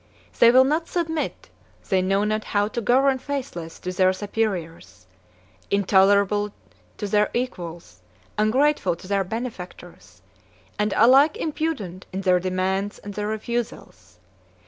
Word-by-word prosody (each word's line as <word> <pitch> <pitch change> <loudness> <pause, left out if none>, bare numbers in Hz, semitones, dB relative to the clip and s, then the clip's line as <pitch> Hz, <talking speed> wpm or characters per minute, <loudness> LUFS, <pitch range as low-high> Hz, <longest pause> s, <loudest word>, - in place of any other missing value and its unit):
They 235 - +8
will 255 +2 +7
not 310 +5 0
submit; 320 -3 -3 0.4
they 190 -2 +3
know 195 +2 +1
not 215 +1 -1
how 205 0 +1
to 235 - -3
govern 260 +4 +3
faithless 245 - -5
to 180 - -4
their 185 0 +3
superiors, 175 - -4 0.6
intolerable 200 +1 +3 0.4
to - - -4
their 210 +1 +2
equals, 175 - -5 0.3
ungrateful 215 - +2
to 180 - -13
their 200 0 +1
benefactors, 180 - -8 0.6
and 210 0 +1
alike 270 +7 +6
impudent 290 - -3
in 190 +1 -4
their 185 -2 +3
demands 190 +2 -1
and 205 - -9
their 210 +1 -3
refusals. 215 - -5
205 Hz, 125 wpm, -23 LUFS, 185-240 Hz, 0.6 s, They